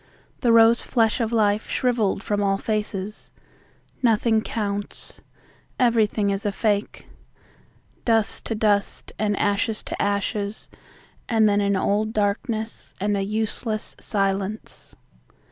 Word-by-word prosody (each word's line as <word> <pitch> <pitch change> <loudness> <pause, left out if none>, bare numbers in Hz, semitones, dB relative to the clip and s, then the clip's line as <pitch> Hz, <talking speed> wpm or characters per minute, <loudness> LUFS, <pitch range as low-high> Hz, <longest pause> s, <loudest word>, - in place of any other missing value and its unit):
The 240 - +3
rose 230 +1 +6
flesh 225 -2 +1
of 230 -1 0
life 215 -2 +1
shriveled 230 -5 0
from 205 -1 -1
all 195 -1 +2
faces. 210 -1 -3 0.7
Nothing 225 -2 +3
counts. 205 -2 -4 0.6
Everything 220 -4 +2
is 195 0 -2
a 205 - 0
fake. 205 0 -1 1.0
Dust 225 -2 +1
to 225 - -2
dust 205 -2 0
and 205 -1 0
ashes 205 +2 0
to - - -4
ashes 200 +1 -2 0.6
and 220 -2 +4
then 205 0 +3
an 200 0 +1
old 210 +3 0
darkness 215 +2 -2
and 205 +1 0
a 200 - 0
useless 215 +2 -3
silence. 195 0 -3
210 Hz, 120 wpm, -24 LUFS, 200-225 Hz, 1.0 s, rose